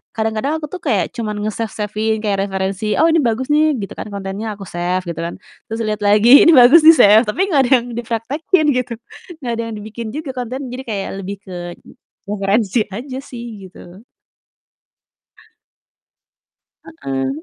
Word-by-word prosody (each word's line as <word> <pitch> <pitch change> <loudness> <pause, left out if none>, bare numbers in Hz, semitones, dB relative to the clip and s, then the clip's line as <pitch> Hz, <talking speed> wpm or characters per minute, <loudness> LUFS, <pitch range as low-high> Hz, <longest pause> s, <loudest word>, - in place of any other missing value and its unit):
kadang-kadang 220 +7 -1
aku 300 - -5
tuh 370 - -6
kayak 210 - 0
cuman 215 -3 -3
nge-save-save-in 215 0 -2
kayak 200 -2 0
referensi, 195 +2 -2
"Oh 320 - +5
ini 330 - +3
bagus 235 +2 -1
nih." 305 0 +3
Gitu 200 -3 -6
kan - - -7
kontennya, 200 +2 -5
aku 200 - -10
save 180 +1 -2
gitu 165 -1 -5
kan. 170 +1 -4 0.3
Terus 225 - -4
liat 215 0 -2
lagi 215 +7 +7
"Ini 335 - +8
bagus." 255 +6 +8
di-save 245 -9 +7
tapi 375 - 0
nggak 280 - +4
ada - - -7
yang 245 - -10
dipraktekkin 260 - -1
gitu, 250 -1 -2 0.5
nggak 240 - -2
ada 230 - -3
yang 220 - -6
dibikin 220 +2 -7
juga 300 -2 -5
kontennya. 255 +2 -5
Jadi - - -7
kayak 200 -3 -3
lebih 200 +2 -6
ke 185 - -9 0.7
referensi 200 +1 0
aja 255 +6 -6
sih 235 -6 -9
gitu. 180 +2 -14 3.0
Heeh. 135 -1 -2
220 Hz, 160 wpm, -18 LUFS, 200-255 Hz, 3.0 s, Ini